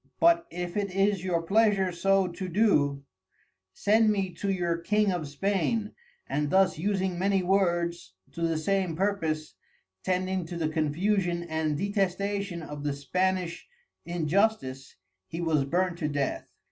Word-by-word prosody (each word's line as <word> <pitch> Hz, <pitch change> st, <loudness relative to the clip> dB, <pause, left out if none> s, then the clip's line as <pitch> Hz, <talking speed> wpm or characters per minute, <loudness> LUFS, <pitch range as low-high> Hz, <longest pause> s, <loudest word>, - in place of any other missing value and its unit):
But 335 Hz, 0 st, +4 dB
if 175 Hz, 0 st, -5 dB
it 200 Hz, -1 st, 0 dB
is 195 Hz, -1 st, +2 dB
your 170 Hz, -3 st, 0 dB
pleasure 200 Hz, 0 st, +3 dB
so 195 Hz, +2 st, +2 dB
to 180 Hz, +1 st, -5 dB
do, 150 Hz, -9 st, +2 dB, 0.7 s
send 215 Hz, -, +3 dB
me 195 Hz, -4 st, 0 dB
to 200 Hz, -, -2 dB
your 175 Hz, -3 st, 0 dB
King 210 Hz, +3 st, +2 dB
of 175 Hz, -5 st, -3 dB
Spain, 200 Hz, +7 st, -1 dB, 0.3 s
and 150 Hz, 0 st, -1 dB
thus 190 Hz, -2 st, +3 dB
using 190 Hz, -1 st, -1 dB
many 195 Hz, 0 st, +2 dB
words 175 Hz, -, 0 dB, 0.2 s
to 170 Hz, -, -8 dB
the 165 Hz, -1 st, +1 dB
same 185 Hz, +1 st, 0 dB
purpose, 165 Hz, -5 st, -1 dB, 0.5 s
tending 185 Hz, -1 st, -1 dB
to 175 Hz, -, -6 dB
the 160 Hz, -2 st, 0 dB
Confusion 170 Hz, +3 st, 0 dB
and 160 Hz, -2 st, -1 dB
Detestation 200 Hz, -1 st, -1 dB
of 150 Hz, -1 st, -7 dB
the 145 Hz, -1 st, 0 dB
Spanish 180 Hz, +5 st, -1 dB, 0.4 s
Injustice, 170 Hz, -5 st, 0 dB, 0.3 s
he 165 Hz, -, -6 dB
was 160 Hz, -5 st, +1 dB
burnt 175 Hz, +3 st, 0 dB
to 150 Hz, -, 0 dB
Death. 145 Hz, -2 st, -2 dB
180 Hz, 145 wpm, -28 LUFS, 160-195 Hz, 0.7 s, But